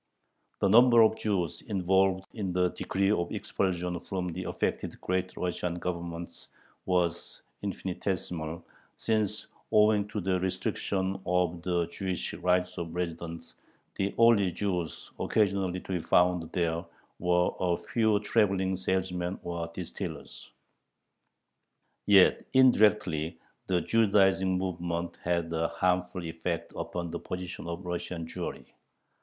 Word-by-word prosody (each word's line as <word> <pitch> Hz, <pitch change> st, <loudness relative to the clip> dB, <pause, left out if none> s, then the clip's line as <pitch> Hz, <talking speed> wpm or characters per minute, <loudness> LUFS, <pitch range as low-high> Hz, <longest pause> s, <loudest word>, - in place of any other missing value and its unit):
The -, -, +4 dB
number 120 Hz, +3 st, +7 dB
of 110 Hz, -, +4 dB
Jews 95 Hz, -8 st, -1 dB
involved 95 Hz, -1 st, +2 dB
in 100 Hz, -5 st, -3 dB
the 90 Hz, 0 st, +2 dB
decree 95 Hz, +1 st, 0 dB
of 85 Hz, -5 st, 0 dB
expulsion 90 Hz, -2 st, -1 dB
from 90 Hz, +1 st, -3 dB
the 85 Hz, -, -5 dB
affected -, -, -2 dB
Great 90 Hz, 0 st, -2 dB
Russian 90 Hz, -1 st, -2 dB
Governments 85 Hz, -1 st, -5 dB, 0.4 s
was 90 Hz, -2 st, 0 dB, 0.2 s
infinitesimal, 90 Hz, -4 st, -3 dB, 0.3 s
since, 110 Hz, -3 st, 0 dB, 0.3 s
owing 105 Hz, -1 st, +4 dB
to 105 Hz, 0 st, -4 dB
the 95 Hz, -1 st, 0 dB
restriction 95 Hz, +1 st, -1 dB
of 90 Hz, -1 st, +1 dB
the 85 Hz, -1 st, 0 dB
Jewish 90 Hz, +2 st, -3 dB
right 90 Hz, +1 st, +2 dB
of 85 Hz, -1 st, -5 dB
residence, 85 Hz, -1 st, -5 dB, 0.4 s
the 100 Hz, +1 st, -2 dB
only 115 Hz, -5 st, +5 dB
Jews 90 Hz, -4 st, -3 dB
occasionally 95 Hz, -4 st, +1 dB
to -, -, -8 dB
be 90 Hz, -, 0 dB
found 90 Hz, -1 st, +2 dB
there 85 Hz, -1 st, 0 dB, 0.4 s
were 90 Hz, 0 st, +2 dB
a 90 Hz, -2 st, +1 dB
few 110 Hz, -3 st, +1 dB
traveling 95 Hz, -3 st, +2 dB
salesmen 95 Hz, -1 st, -1 dB
or 85 Hz, -1 st, -3 dB
distillers. 85 Hz, -2 st, -7 dB, 1.6 s
Yet, 100 Hz, -2 st, +6 dB
indirectly, 105 Hz, -, +4 dB, 0.3 s
the 90 Hz, -2 st, +2 dB
Judaizing 95 Hz, -2 st, +3 dB
movement 85 Hz, -2 st, -3 dB
had 85 Hz, -1 st, 0 dB
a 80 Hz, 0 st, +1 dB
harmful 90 Hz, 0 st, 0 dB
effect 85 Hz, +1 st, -4 dB
upon 85 Hz, -1 st, -4 dB
the 85 Hz, -, -4 dB
position 90 Hz, -1 st, -6 dB
of 85 Hz, +2 st, -5 dB
Russian 90 Hz, -1 st, -4 dB
Jewry. 80 Hz, -, -6 dB
90 Hz, 120 wpm, -29 LUFS, 85-95 Hz, 1.6 s, number